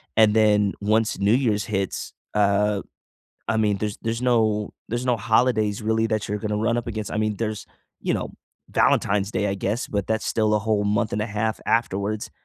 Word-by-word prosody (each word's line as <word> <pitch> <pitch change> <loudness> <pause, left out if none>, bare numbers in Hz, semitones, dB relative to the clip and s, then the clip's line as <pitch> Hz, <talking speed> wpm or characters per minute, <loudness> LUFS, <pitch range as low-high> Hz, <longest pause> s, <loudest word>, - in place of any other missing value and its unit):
and 110 -1 +5
then 105 -2 +4
once 110 +2 +1
New 100 +2 +3
Year's 115 -5 +1
hits, 100 -4 -3 0.2
uh, 105 0 +2 0.7
I 110 - +1
mean, 105 -2 +1
there's 105 0 -3
there's 115 +1 -2
no 110 -4 +1
there's 120 +3 -2
no 125 -1 +3
holidays 110 -1 +2
really 110 +1 +1
that 110 -2 -1
you're 105 - -1
gonna 105 0 -2
run 110 +2 +1
up 120 - -3
against, 110 -2 -4
I - - -2
mean, 110 -1 0
there's, 110 -1 -3 0.3
you - - 0
know, - - -3 0.4
Valentine's 100 0 +2
Day, 105 - 0
I 95 - -1
guess, 100 +4 -2
but 100 -2 -2
that's 110 0 -1
still 110 -1 +1
a - - +3
whole 105 -1 0
month 105 +2 0
and 105 - -1
a - - -2
half 110 +1 -2
afterwards, 105 -2 0
105 Hz, 200 wpm, -24 LUFS, 105-110 Hz, 0.7 s, and